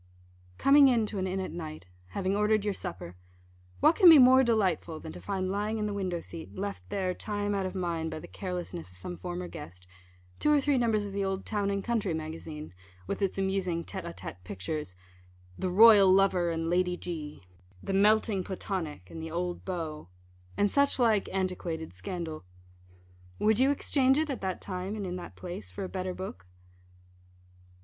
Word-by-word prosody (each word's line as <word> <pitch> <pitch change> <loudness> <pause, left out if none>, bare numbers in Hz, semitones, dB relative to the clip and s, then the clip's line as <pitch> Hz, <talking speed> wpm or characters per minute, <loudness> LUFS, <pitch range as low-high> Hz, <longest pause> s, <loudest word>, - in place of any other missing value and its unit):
Coming 280 0 +7
in 235 -4 +3
to 210 -1 -4
an 190 - -1
inn 190 +1 -2
at 190 - -4
night 155 - -7 0.2
having 190 - -1
ordered 210 0 +2
your 205 - +1
supper 175 - -6 0.7
what 325 - +6
can 370 -5 +8
be 320 - +10
more 260 0 +7
delightful 185 -9 +1
than 160 - -8
to - - -10
find 190 -2 -2
lying 210 +3 -1
in 210 - -1
the 210 - -2
window 185 -4 -2
seat, 165 -1 -9
left 200 +1 -5
there 190 -3 -1
time 205 +1 -2
out 195 -1 0
of 185 - -7
mind 170 -3 -2
by 160 - -5
the - - -10
carelessness 180 - -5
of 90 - -11
some 175 - -6
former 180 0 -5
guest 90 - -10 0.5
two 300 - +3
or 295 - +5
three 275 -1 +2
numbers 220 -3 +1
of 200 - -7
the 200 0 -1
old 195 0 -2
Town 205 -2 -1
and 200 -1 -1
Country 215 -8 0
Magazine, 155 - -7 0.3
with - - -4
its 195 -1 0
amusing 190 -3 -1
tête 190 -2 -6
à 170 - -6
tête - - -8
pictures 95 - -5 0.6
"The 185 - -1
Royal 205 0 +8
Lover 185 -2 +4
and 165 0 -2
Lady 180 +1 +1
G 155 - -6 0.2
;" 90 0 -26
"The 195 - -3
Melting 205 0 +3
Platonic 175 - -4
and 160 - -7
the 160 - -5
old 175 +2 -3
Beau," 160 - -5 0.5
and 205 0 +2
such 280 0 +3
like 225 -5 +3
antiquated 180 - -3
scandal? 160 - -5 0.9
Would 215 +1 +2
you 265 +1 +5
exchange 270 -1 +2
it 310 -1 0
at 265 - -4
that 190 -1 -3
time, 185 +2 -4
and 205 -2 -4
in 180 -1 -4
that 180 - -9
place 175 - -7
for 90 - -6
a - - -3
better 185 -1 -4
book? 90 - -7
185 Hz, 190 wpm, -29 LUFS, 170-205 Hz, 0.9 s, be